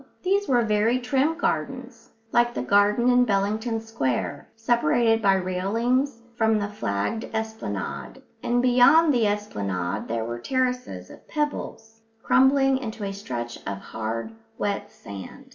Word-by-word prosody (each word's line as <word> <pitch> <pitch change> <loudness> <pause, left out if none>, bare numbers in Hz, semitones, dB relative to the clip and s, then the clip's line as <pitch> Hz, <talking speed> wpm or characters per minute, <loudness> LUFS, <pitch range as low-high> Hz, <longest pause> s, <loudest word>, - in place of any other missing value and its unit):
These 395 +2 +1
were 245 -3 +3
very 215 +3 +2
trim 270 +5 0
gardens, 250 - -3 0.2
like 240 0 +2
the - - -2
garden 205 +4 +3
in 250 0 +5
Bellington 220 +2 0
Square, 140 - -3
separated 225 0 +2
by 195 -2 +4
railings 230 +8 0
from 220 -2 +2
the 205 -1 -2
flagged 205 - -2
esplanade; 220 0 -5 0.2
and 245 +1 +1
beyond 280 +6 +6
the 235 -4 +3
esplanade 100 - -2
there 115 0 -2
were 120 +1 -5
terraces 255 - -2
of - - -15
pebbles, 225 -7 -4 0.2
crumbling 270 0 +4
into 220 -4 -6
a 195 0 -3
stretch 120 -11 -5
of 100 0 -3
hard, 110 - -5 0.3
wet 200 -1 -2
sand. 100 -1 -10
225 Hz, 135 wpm, -25 LUFS, 195-250 Hz, 0.3 s, beyond